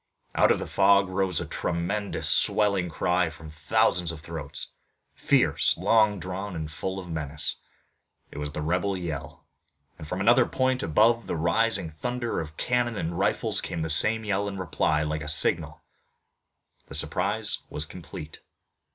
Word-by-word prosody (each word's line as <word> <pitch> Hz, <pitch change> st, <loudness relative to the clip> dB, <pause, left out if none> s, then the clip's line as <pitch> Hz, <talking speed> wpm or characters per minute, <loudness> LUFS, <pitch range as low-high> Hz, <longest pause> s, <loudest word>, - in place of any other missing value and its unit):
Out -, -, +4 dB
of -, -, +3 dB
the -, -, -5 dB
fog 100 Hz, 0 st, +4 dB
rose 95 Hz, -3 st, 0 dB
a -, -, -4 dB
tremendous 95 Hz, +4 st, -2 dB
swelling 100 Hz, -4 st, +3 dB
cry 90 Hz, +2 st, +1 dB
from 80 Hz, 0 st, -12 dB
thousands 85 Hz, +2 st, +1 dB
of 85 Hz, -, -8 dB
throats, -, -, -6 dB, 0.4 s
fierce, -, -, +2 dB
long 110 Hz, -3 st, +3 dB
drawn, 95 Hz, +2 st, -5 dB
and 80 Hz, -2 st, -5 dB
full 95 Hz, +5 st, -4 dB
of 95 Hz, -2 st, -7 dB
menace. 80 Hz, -1 st, -3 dB, 0.7 s
It -, -, -8 dB
was 75 Hz, 0 st, -4 dB
the 75 Hz, +1 st, -4 dB
rebel 90 Hz, +4 st, 0 dB
yell, 80 Hz, -6 st, -6 dB, 0.5 s
and 75 Hz, -, -8 dB
from 90 Hz, -, -4 dB
another 120 Hz, +5 st, +4 dB
point 130 Hz, 0 st, 0 dB
above 115 Hz, +8 st, +3 dB
the -, -, -2 dB
rising 85 Hz, +2 st, +1 dB
thunder 120 Hz, +9 st, -3 dB
of 75 Hz, -1 st, -7 dB
cannon 120 Hz, -2 st, 0 dB
and 85 Hz, -2 st, -3 dB
rifles -, -, +1 dB
came 80 Hz, -, -4 dB
the 80 Hz, -, 0 dB
same 110 Hz, +8 st, +5 dB
yell 100 Hz, 0 st, 0 dB
in 100 Hz, -1 st, -5 dB
reply, 80 Hz, -4 st, 0 dB
like 75 Hz, 0 st, -3 dB
a 75 Hz, -, -4 dB
signal. 75 Hz, -, +2 dB, 1.0 s
The -, -, -7 dB
surprise 105 Hz, +4 st, 0 dB
was -, -, -2 dB
complete. 75 Hz, +1 st, -10 dB
90 Hz, 160 wpm, -26 LUFS, 80-105 Hz, 1.0 s, same